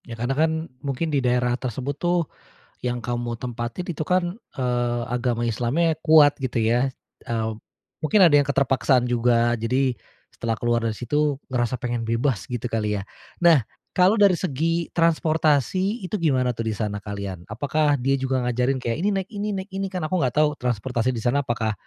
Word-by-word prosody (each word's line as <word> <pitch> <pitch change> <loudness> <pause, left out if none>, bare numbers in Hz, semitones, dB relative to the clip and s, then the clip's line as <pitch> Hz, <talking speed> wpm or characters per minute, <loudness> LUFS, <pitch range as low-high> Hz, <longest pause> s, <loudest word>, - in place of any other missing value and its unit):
Ya, 115 -2 -8
karena 120 +3 -1
kan, 160 +3 +2 0.3
mungkin 140 +3 -2
di 140 - +2
daerah 125 -1 +1
tersebut 130 +3 -3
tuh, 175 -1 +2 0.6
yang 120 0 -1
kamu 120 +1 -3
mau 120 -1 -3
tempatin 120 +7 -5
itu 160 -3 -3
kan, 180 +2 0 0.2
eee, 120 -2 -1
agama 120 -1 -1
Islamnya 140 +9 +1
kuat, 155 -3 +6
gitu 130 -4 -2
ya. 120 +4 +2 0.3
Eee, 115 -2 -1 0.6
mungkin 205 +7 +3
ada 170 -5 +7
yang 145 - +5
keterpaksaan 135 -2 +2
juga, 120 0 +2
jadi 125 +3 0 0.4
setelah 115 -1 -3
keluar 120 -1 +1
dari 115 - 0
situ 145 +4 0
ngerasa 125 -1 -1
pengen 120 -2 -2
bebas, 115 +1 0
gitu 125 0 -4
kali 105 -3 -1
ya. - - -6 0.4
Nah, 165 -8 +5 0.3
kalau 190 +4 +4
dari 200 -3 +6
segi 165 +1 -1
transportasi 165 - +1
itu 185 - -2
gimana 130 -6 +2
tuh, 115 -1 -3
di 110 - -2
sana 105 -1 -3
kalian? 100 -4 -6
Apakah 145 +6 +1
dia 135 +1 0
juga 130 -1 0
ngajarin 125 +2 +1
kayak 115 - 0
ini, 195 - +1
naik 190 0 -3
ini, 205 0 -3
naik 190 +1 -6
ini, 195 0 -2
kan 180 -4 -4
aku 180 +3 0
gak 125 -2 0
tau 150 0 +4
transportasi 125 0 -1
di 120 -4 -2
sana 130 +4 +2
apakah 115 -5 -1
130 Hz, 180 wpm, -24 LUFS, 120-155 Hz, 0.6 s, ada